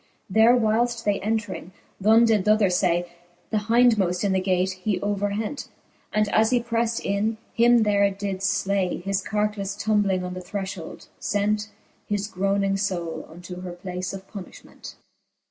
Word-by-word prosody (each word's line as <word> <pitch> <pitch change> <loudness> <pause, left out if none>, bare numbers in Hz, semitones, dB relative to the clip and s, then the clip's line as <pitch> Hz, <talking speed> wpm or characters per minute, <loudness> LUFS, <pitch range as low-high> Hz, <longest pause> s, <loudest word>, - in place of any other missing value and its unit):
There 225 +4 +6
whileft 235 +1 +1
they 205 -1 +1
entring, 205 -3 -3 0.3
th'one 220 +4 +6
did 220 -4 +3
th'other 210 -1 +4
ftay. 175 -1 +1 0.4
The 220 - +1
hindmoft 220 -7 +3
in 200 - +1
the 190 - +2
gate 185 0 +1
he 185 +1 -2
overhent. 205 +5 -2 0.4
And 215 0 +2
as 220 +2 +3
he 250 0 +3
prefled 230 -1 -1
in, 210 +3 0 0.2
him 235 0 +5
there 200 -1 +3
did 195 -1 -4
flay: 195 -2 0
His 195 0 0
carcafle 210 -1 -2
tumbling 205 -4 +1
on 180 0 -4
the 185 - -6
threfliold 190 -2 -6 0.2
fent 210 +1 0 0.4
His 205 -1 -1
groning 195 0 0
fbule 170 -5 -3
unto 180 +2 -9
her 180 -1 -6
place 180 0 -5
of 195 0 -9
punifliment. 195 -3 -11
200 Hz, 150 wpm, -24 LUFS, 185-215 Hz, 0.4 s, There